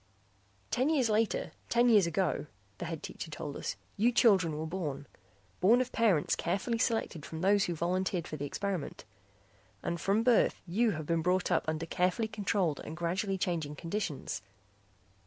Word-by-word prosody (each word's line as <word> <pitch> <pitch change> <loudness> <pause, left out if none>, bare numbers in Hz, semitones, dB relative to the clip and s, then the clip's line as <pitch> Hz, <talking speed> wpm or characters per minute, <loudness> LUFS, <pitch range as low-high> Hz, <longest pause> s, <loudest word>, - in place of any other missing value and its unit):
"Ten 260 +4 +2
years 265 -8 +2
later, 215 +1 +1 0.2
ten 240 +1 +4
years 210 -7 +6
ago," 170 -2 0 0.3
the - - -3
Head 165 -2 -5
Teacher - - -6
told 150 -1 -6
us, - - -3 0.2
"you 230 +4 +4
children 190 -10 +4
were 155 - -3
born. 155 -5 -4 0.5
Born 220 +7 +5
of 255 0 -1
parents 200 -10 +2
carefully 200 +7 -1
selected 225 - 0
from 160 +2 -6
those 200 +1 +4
who 175 - -2
volunteered 180 +1 -1
for - - -5
the 145 -1 -4
experiment. 190 -1 -4 0.8
And 170 -1 -2
from 205 +3 +2
birth 240 -1 +3
you 215 +7 +2
have 155 -1 -5
been 165 +1 +1
brought 180 +2 +1
up 175 - +2
under 160 +1 -1
carefully 180 +6 0
controlled 200 -7 -1
and 160 - -7
gradually 190 +3 -1
changing 165 -5 -2
conditions. 165 - -3
180 Hz, 165 wpm, -31 LUFS, 160-215 Hz, 0.8 s, years